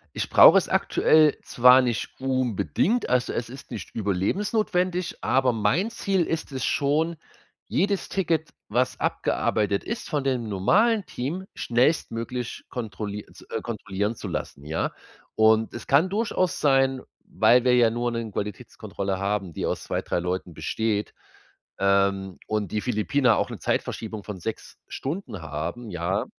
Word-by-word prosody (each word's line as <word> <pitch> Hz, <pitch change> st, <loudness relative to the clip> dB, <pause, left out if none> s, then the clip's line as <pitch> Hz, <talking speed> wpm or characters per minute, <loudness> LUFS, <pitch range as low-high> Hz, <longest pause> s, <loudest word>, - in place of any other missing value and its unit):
Ich -, -, -2 dB
brauche -, -, +9 dB
es -, -, +1 dB
aktuell 155 Hz, -2 st, +4 dB
zwar 125 Hz, +2 st, +6 dB
nicht 120 Hz, -2 st, -3 dB
unbedingt, 130 Hz, -, 0 dB
also 125 Hz, 0 st, +1 dB
es 115 Hz, -, -3 dB
ist 135 Hz, +3 st, -11 dB
nicht -, -, -7 dB
überlebensnotwendig, 180 Hz, -, 0 dB
aber 130 Hz, -1 st, +2 dB
mein 115 Hz, -, +1 dB
Ziel 195 Hz, -5 st, 0 dB
ist 165 Hz, -2 st, -3 dB
es 130 Hz, -2 st, -2 dB
schon, 155 Hz, +4 st, +1 dB, 0.5 s
jedes 200 Hz, +1 st, 0 dB
Ticket, 165 Hz, -4 st, 0 dB, 0.2 s
was 125 Hz, +4 st, 0 dB
abgearbeitet 105 Hz, -2 st, 0 dB
ist, 230 Hz, +2 st, -5 dB
von 150 Hz, -4 st, -1 dB
dem 125 Hz, -5 st, -1 dB
normalen 200 Hz, -, +2 dB
Team 160 Hz, +10 st, -4 dB
schnellstmöglich 120 Hz, -2 st, -1 dB
kontrolli 105 Hz, -3 st, -5 dB
z-kontrollieren 105 Hz, +4 st, -4 dB
zu -, -, -7 dB
lassen, 70 Hz, -, -5 dB
ja. 80 Hz, +2 st, -2 dB, 0.4 s
Und 110 Hz, +1 st, +3 dB
es 120 Hz, -, -7 dB
kann 150 Hz, +7 st, +3 dB
durchaus 200 Hz, -3 st, 0 dB
sein, 135 Hz, -2 st, +3 dB, 0.2 s
weil 125 Hz, 0 st, +4 dB
wir 125 Hz, -1 st, +4 dB
ja 120 Hz, -2 st, +4 dB
nur 120 Hz, +1 st, -1 dB
'ne 115 Hz, -2 st, -4 dB
Qualitätskontrolle 100 Hz, -1 st, -4 dB
haben, 100 Hz, -2 st, -2 dB
die -, -, -2 dB
aus -, -, -2 dB
2, -, -, -2 dB
3 -, -, -2 dB
Leuten 90 Hz, -1 st, -3 dB
besteht, 110 Hz, +2 st, -2 dB, 0.7 s
ähm, 100 Hz, -1 st, +1 dB
und 105 Hz, -4 st, -2 dB
die 105 Hz, -, -1 dB
Philippiner 125 Hz, +1 st, +2 dB
auch -, -, 0 dB
'ne -, -, -7 dB
Zeitverschiebung 110 Hz, -2 st, -3 dB
von 100 Hz, -3 st, -7 dB
6 110 Hz, +5 st, -6 dB
Stunden 135 Hz, -, -5 dB
haben, 80 Hz, +10 st, -5 dB
ja, 90 Hz, +3 st, -1 dB
120 Hz, 145 wpm, -25 LUFS, 105-150 Hz, 0.7 s, brauche